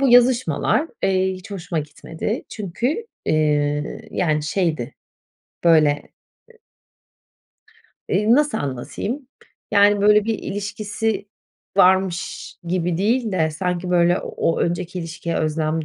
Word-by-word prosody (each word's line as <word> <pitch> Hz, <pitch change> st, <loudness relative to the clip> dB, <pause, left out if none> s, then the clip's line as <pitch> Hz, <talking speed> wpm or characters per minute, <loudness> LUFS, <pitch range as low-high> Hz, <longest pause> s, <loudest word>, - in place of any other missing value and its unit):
bu 275 Hz, -, +3 dB
yazışmalar, 245 Hz, -, +3 dB
iii, 190 Hz, 0 st, +2 dB
hiç 185 Hz, +2 st, -12 dB
hoşuma 180 Hz, -4 st, -3 dB
gitmedi. 160 Hz, +7 st, -4 dB
Çünkü, 240 Hz, -, -3 dB, 0.2 s
ııı, 150 Hz, -1 st, +1 dB
yani 155 Hz, -4 st, 0 dB
şeydi 155 Hz, -5 st, -1 dB, 0.7 s
böyle, 155 Hz, -3 st, +4 dB, 2.1 s
ııı, 210 Hz, +4 st, +4 dB
nasıl 295 Hz, +2 st, +2 dB
anlatayım, 200 Hz, -, -4 dB, 0.4 s
yani, 205 Hz, 0 st, +5 dB
böyle 210 Hz, 0 st, +5 dB
bir 225 Hz, -1 st, -1 dB
ilişkisi 205 Hz, +1 st, -3 dB, 0.5 s
varmış 185 Hz, -1 st, +2 dB
gibi 175 Hz, -1 st, -1 dB
değil 220 Hz, +4 st, +1 dB
de 160 Hz, -4 st, +1 dB
sanki 180 Hz, +2 st, -2 dB
böyle 175 Hz, 0 st, +4 dB
o 165 Hz, -, -1 dB
önceki 175 Hz, +1 st, -2 dB
ilişkiye 170 Hz, 0 st, -4 dB
özlem 155 Hz, 0 st, 0 dB
185 Hz, 105 wpm, -21 LUFS, 160-210 Hz, 2.1 s, yani